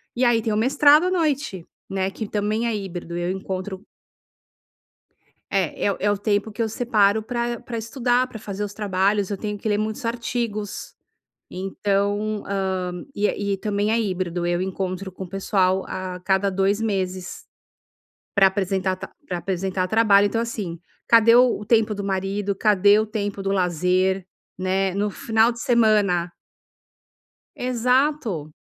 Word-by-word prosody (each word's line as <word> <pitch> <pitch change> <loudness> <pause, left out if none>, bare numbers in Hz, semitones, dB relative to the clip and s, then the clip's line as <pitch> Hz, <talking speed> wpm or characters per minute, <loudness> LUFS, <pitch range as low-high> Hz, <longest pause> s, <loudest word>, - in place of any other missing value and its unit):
E 250 - 0
aí 240 -2 +4
tem 220 -1 -1
o - - 0
mestrado 285 +7 +5
à - - 0
noite, 290 - -1 0.2
né, 190 0 -1
que 220 +2 -5
também 215 +3 -1
é 230 - 0
híbrido. 175 -4 -5
Eu 175 +1 -1
encontro 190 0 -5 1.6
É. 190 -5 0
É 200 - -1
é 205 +1 +2
o 205 - 0
tempo 205 +1 0
que 210 - -5
eu 225 - 0
separo 220 -3 +2
pra 240 0 -2
pra 240 -1 -6
estudar, 245 +2 0
pra 225 - -9
fazer 205 -1 -5
os 205 -1 -5
trabalhos, 200 -1 0
eu 200 - -3
tenho 210 +1 -4
que 205 - -5
ler 205 - +2
muitos 215 +2 -3
artigos. 230 -3 -3 0.6
Então, 200 +2 -1
hã, 185 -2 -2
e 205 -1 0
e - - -2
também 205 +1 -1
é 230 - +2
híbrido. 180 -4 -2
Eu 175 0 0
encontro 190 0 -3
com 185 - -8
o - - -14
pessoal 190 -1 +1
a 185 -1 -5
cada 190 +1 +1
2 195 +2 +1
meses. 185 -4 -3 0.9
Pra 195 -1 +6
apresentar 190 -1 0
ta - - -9 0.2
pra 180 - -3
apresentar 185 +1 -2
trabalho, 205 -1 +5
então, 225 +3 -1
assim. 210 -7 -4 0.3
Cadê 230 0 +6
o 245 -4 +4
tempo 220 0 +2
do 200 0 -5
marido, 195 +1 -1
cadê 205 0 +4
o 220 - -1
tempo 205 -2 -3
do 195 - -1
lazer, 185 +1 +1 0.3
né. 190 0 0
No 205 +1 0
final 225 +3 +2
de 235 0 -7
semana 210 -8 +3 1.3
Exato! 250 - 0
200 Hz, 155 wpm, -23 LUFS, 190-225 Hz, 1.6 s, Pra